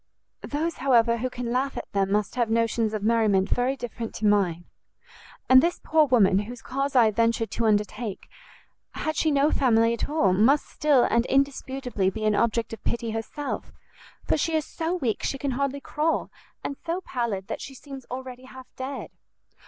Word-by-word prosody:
"Those, 320 +3 -3
however, 235 -3 +3
who 255 +2 -2
can 245 -1 -5
laugh 265 +2 -1
at - - -7
them 195 -1 0
must 205 0 0
have 240 -3 0
notions 230 -1 +1
of 210 - -4
merriment 215 -4 +3
very 250 +2 +1
different 235 -2 -6
to 215 - -3
mine. 185 -5 +2 0.8
And 260 0 +8
this 345 +3 0
poor 310 -1 +3
woman, 205 -7 +4
whose 230 +4 -7
cause 275 +1 -2
I 240 -3 +7
have 215 -2 +1
ventured 230 -1 +1
to 230 - 0
undertake, 210 0 -1 0.7
had 310 0 -3
she 315 - +2
no 285 +1 +3
family 230 -3 +3
at 235 - -3
all, 290 -12 +2
must 245 +10 +4
still 290 -5 +2
and 235 +1 +2
indisputably 265 -6 0
be 215 +3 -4
an 215 - +3
object 230 +1 0
of 225 - -9
pity 235 -1 -2
herself, 225 +6 -5 0.5
for - - +2
she 320 +2 0
is 310 -1 0
so 330 +2 -3
weak 250 -11 -1
she 275 - -2
can 275 0 -2
hardly 275 +2 -1
crawl, 310 +3 -1 0.3
and 280 - -4
so 340 +3 -2
pallid 235 - -3
that - - -5
she 270 - -8
seems 270 -1 -10
already 255 0 -7
half 260 0 -11
dead." 265 +1 -6
245 Hz, 185 wpm, -25 LUFS, 220-275 Hz, 0.8 s, And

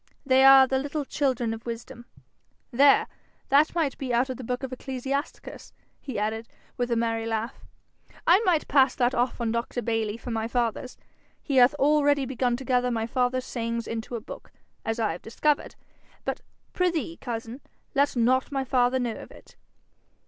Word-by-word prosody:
'They 265 0 +4
are 270 0 +9
the 265 0 0
little 285 +1 -3
children 255 -6 -1
of 225 0 -8
wisdom. 235 0 -7 0.7
There! 275 +3 +5 0.4
that 290 +5 +4
might 315 -5 0
be 265 -2 -3
out 245 +2 +1
of 255 - -6
the 260 - -8
book 250 +3 -3
of 265 -1 -4
Ecclesiasticus,' 265 +3 -5 0.3
he 265 -6 -6
added, 220 +2 -2 0.3
with 245 0 -2
a 235 - +1
merry 225 -1 -1
laugh. 225 +2 -3 0.6
'I 355 +3 +6
might 360 -8 +1
pass 270 -2 +4
that 245 0 +1
off 245 +1 0
on 235 -2 -1
Dr. 235 +1 -2
Bayly 225 -1 -1
for 240 +1 -7
my 225 0 -2
father's: 240 +1 -2 0.5
he 275 -3 -1
hath 255 +3 +6
already 290 -1 +3
begun 250 -1 -1
to 265 - -9
gather 250 0 +2
my 225 -2 -1
father's 250 +1 0
sayings 230 -1 -3
into 230 +1 -5
a - - -3
book, - - -11 0.3
as 225 +1 -2
I 220 -2 +1
have 170 - -7
discovered. 295 +6 -1 0.5
But, - - -3 0.3
prithee, 340 -2 -1
cousin, 235 +1 -6 0.3
let 280 0 +2
not 255 +4 +2
my 270 -1 -1
father 255 -1 +2
know 245 -3 -1
of - - -10
it.' - - -17
250 Hz, 180 wpm, -26 LUFS, 230-270 Hz, 0.7 s, are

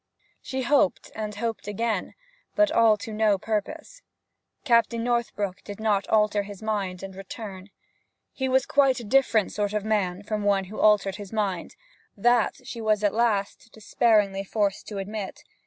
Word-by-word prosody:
She 260 0 -4
hoped 270 -7 +2
and 215 -1 -5
hoped 225 0 -4
again, 210 -1 -2 0.4
but 315 -1 +4
all 230 -6 +5
to 220 +1 -7
no 215 -2 +3
purpose. 265 - -4 0.6
Captain 235 -2 +3
Northbrook 215 -5 -1
did 205 0 -8
not 210 -3 +1
alter 210 -1 +3
his 200 -1 -9
mind 200 -4 -3
and 195 0 -7
return. 195 0 -8 0.6
He 265 -1 -2
was 260 0 +3
quite 275 -3 +3
a - - -7
different 230 -3 +2
sort 205 -1 -2
of 210 -1 -2
man 200 -3 0
from 210 +1 -3
one 200 -1 +2
who 195 +3 -9
altered 205 -2 +3
his 205 -3 -9
mind; 200 -5 -2 0.4
that 240 +2 +2
she 230 - -7
was 215 -1 +1
at 205 - +2
last 220 -1 0
despairingly 210 -3 +2
forced 200 -1 -1
to 210 - -6
admit. 200 0 -5
210 Hz, 160 wpm, -26 LUFS, 200-230 Hz, 0.6 s, all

